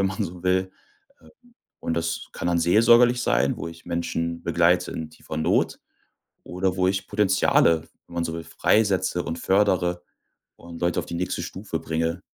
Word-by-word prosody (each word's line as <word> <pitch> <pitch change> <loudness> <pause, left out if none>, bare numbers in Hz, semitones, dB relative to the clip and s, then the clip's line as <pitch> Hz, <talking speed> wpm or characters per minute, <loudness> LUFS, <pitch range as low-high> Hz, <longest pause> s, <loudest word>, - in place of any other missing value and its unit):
wenn 95 - +3
man 95 +2 -2
so 90 0 -8
will, 95 0 +1 0.5
Äh, - - -19 0.5
und 80 - -2
das 85 0 -3
kann - - -5
dann 85 - +2
seelsorgerlich 120 +7 +5
sein, 65 - +1
wo - - -6
ich 85 0 -13
Menschen 85 -1 -3
begleite 85 +1 +2
in 80 -1 -6
tiefer 80 - -9
Not 80 - +1 0.6
oder 90 +1 -2
wo 90 -1 +2
ich 95 +1 -1
Potenziale, 95 -5 +3 0.2
wenn 85 - -14
man 85 -1 -1
so 80 0 -3
will, 85 - -6
freisetze 95 -4 +1
und 80 - -4
fördere 90 -3 +1 0.6
und 85 -1 -11
Leute 85 0 +1
auf - - -4
die 85 - -5
nächste 90 +2 -2
Stufe - - -5
bringe. 80 +2 -2
90 Hz, 175 wpm, -24 LUFS, 85-95 Hz, 0.6 s, seelsorgerlich